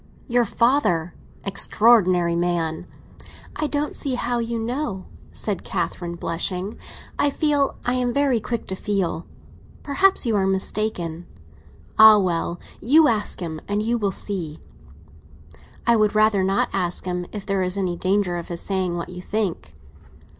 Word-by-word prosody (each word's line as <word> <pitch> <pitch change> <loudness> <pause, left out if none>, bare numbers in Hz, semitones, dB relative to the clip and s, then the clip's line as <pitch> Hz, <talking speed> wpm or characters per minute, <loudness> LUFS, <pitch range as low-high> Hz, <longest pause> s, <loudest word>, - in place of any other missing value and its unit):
"Your 240 -2 +2
father; 205 - +1 0.3
extraordinary 190 -4 +3
man!" 170 -2 -1 0.7
"I 305 - 0
don't 295 0 -2
see 270 -3 -1
how 245 0 -1
you 235 0 -2
know," 230 -3 -3 0.3
said 205 -4 -2
Catherine, 170 0 -3
blushing. 180 +4 -3 0.4
"I 290 - +3
feel; 285 -1 +1
I 245 - +1
am 250 -1 0
very 275 -2 +2
quick 235 +1 -4
to 190 - -2
feel." 190 -4 -2 0.6
"Perhaps 380 +4 +3
you 230 -3 +1
are 195 -1 +2
mistaken." 190 -3 -2 0.7
"Ah, 220 -1 +10
well; 175 -2 -1 0.2
you 300 +7 +5
ask 215 -4 0
him 160 -3 -5
and 205 +1 0
you 235 +2 0
will 200 -2 0
see." 175 -6 -3 1.3
"I 235 - +5
would 215 -1 +2
rather 215 -2 +4
not 195 +1 +1
ask 180 -2 -2
him, 180 -1 -3
if 205 -2 -7
there 195 -1 0
is 185 +1 -1
any 185 -3 -1
danger 185 0 0
of 170 - -8
his 170 -1 -3
saying 185 -3 -1
what 170 - -5
you 180 0 -8
think." 180 - -3
200 Hz, 150 wpm, -23 LUFS, 175-235 Hz, 1.3 s, Ah